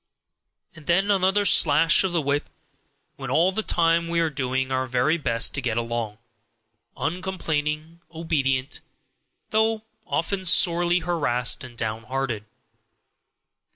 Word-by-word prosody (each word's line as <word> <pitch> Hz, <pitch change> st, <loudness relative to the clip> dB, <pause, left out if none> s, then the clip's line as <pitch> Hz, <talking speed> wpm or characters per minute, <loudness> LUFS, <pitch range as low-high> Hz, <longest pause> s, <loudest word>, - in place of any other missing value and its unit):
And 155 Hz, -, -15 dB
then 195 Hz, +4 st, +2 dB
another 195 Hz, +1 st, +2 dB
slash 160 Hz, -1 st, +5 dB
of 190 Hz, -, -1 dB
the 170 Hz, -3 st, -1 dB
whip, 140 Hz, +1 st, -1 dB, 0.7 s
when 135 Hz, -2 st, -7 dB
all 165 Hz, +8 st, +3 dB
the 220 Hz, -, -2 dB
time 170 Hz, -4 st, +1 dB
we 170 Hz, 0 st, -1 dB
are 165 Hz, -2 st, 0 dB
doing 130 Hz, -1 st, -2 dB
our 130 Hz, 0 st, -1 dB
very 125 Hz, +5 st, +1 dB
best 115 Hz, -5 st, +1 dB
to 140 Hz, -, -3 dB
get 115 Hz, -2 st, -2 dB
along, 115 Hz, -2 st, -3 dB, 0.8 s
uncomplaining 160 Hz, -4 st, -2 dB
and 165 Hz, +2 st, -22 dB
obedient, 145 Hz, -5 st, -2 dB, 0.7 s
though 220 Hz, 0 st, +1 dB, 0.2 s
often 195 Hz, -2 st, -2 dB
sorely 175 Hz, 0 st, +4 dB
harassed 145 Hz, -9 st, +1 dB
and 120 Hz, -2 st, -12 dB
down 110 Hz, 0 st, -4 dB
hearted. 130 Hz, -4 st, -3 dB
155 Hz, 130 wpm, -24 LUFS, 130-175 Hz, 0.8 s, slash